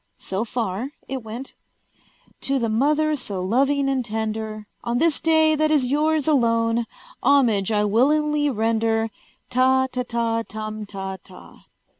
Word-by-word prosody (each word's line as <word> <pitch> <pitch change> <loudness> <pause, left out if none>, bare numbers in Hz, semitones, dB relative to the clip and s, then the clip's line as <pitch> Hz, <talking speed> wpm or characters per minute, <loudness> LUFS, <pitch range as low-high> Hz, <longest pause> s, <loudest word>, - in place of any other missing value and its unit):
So 195 +3 -3
far 230 0 -3 0.2
it 265 -1 -4
went: 230 +4 -7 0.9
"To 275 0 +1
the 235 -3 0
Mother 300 +7 +2
so 205 -8 -5
loving 270 +9 +1
and 265 -2 0
tender, 220 -1 -4 0.2
On 235 0 -1
this 320 +2 +2
day 315 -1 +4
that 310 0 +2
is 295 -4 +3
yours 300 +3 +1
alone, 230 -4 +2 0.4
Homage 230 -8 +3
I 210 -1 +2
willingly 295 +7 +2
render, 225 -1 0 0.4
Ta 260 +1 +3
ta 250 - -2
ta 230 -2 -1
tum 215 -1 -6
ta 190 -1 -5
ta." 185 -2 -16
235 Hz, 140 wpm, -23 LUFS, 220-280 Hz, 0.9 s, day